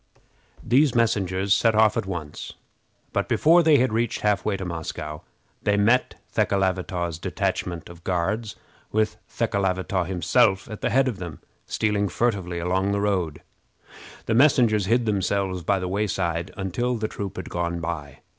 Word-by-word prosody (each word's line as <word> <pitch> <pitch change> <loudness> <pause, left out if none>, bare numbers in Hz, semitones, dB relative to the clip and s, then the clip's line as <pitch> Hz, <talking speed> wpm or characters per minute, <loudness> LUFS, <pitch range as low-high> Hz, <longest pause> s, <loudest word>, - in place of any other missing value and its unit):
These 135 +2 +3
messengers 100 -4 +2
set 110 +2 +3
off 110 -1 +4
at - - -2
once; 80 -6 -6 0.6
but, - - -1
before 170 +3 +5
they 155 -3 +5
had 125 -3 +2
reached 115 0 0
half 105 -1 +1
way 105 -2 0
to 95 - -5
Moscow, 80 -3 -5 0.4
they 100 0 +1
met 115 +5 +3 0.2
Thekelavitaw's 90 -3 0
detachment 85 -1 -2
of 85 0 -13
Guards, 95 +4 -1 0.4
with 110 0 0
Thekelavitaw 95 -2 0
himself 95 +2 +2
at 110 - -7
the - - +1
head 135 +1 +3
of 120 -6 -2
them, 85 -5 -7 0.3
stealing 105 -2 0
furtively 95 -4 -1
along 95 +3 0
the 100 - 0
road. 95 -7 -1 0.8
The 115 - 0
messengers 115 -6 +4
hid 120 +2 +2
themselves 95 -2 0
by 100 +3 +1
the 90 -1 -3
wayside 90 -3 -1
until 105 +6 -1
the 110 -1 -2
troop 100 -2 -6
had - - -6
gone 85 0 -2
by. 80 -4 -5
100 Hz, 155 wpm, -24 LUFS, 90-110 Hz, 0.8 s, before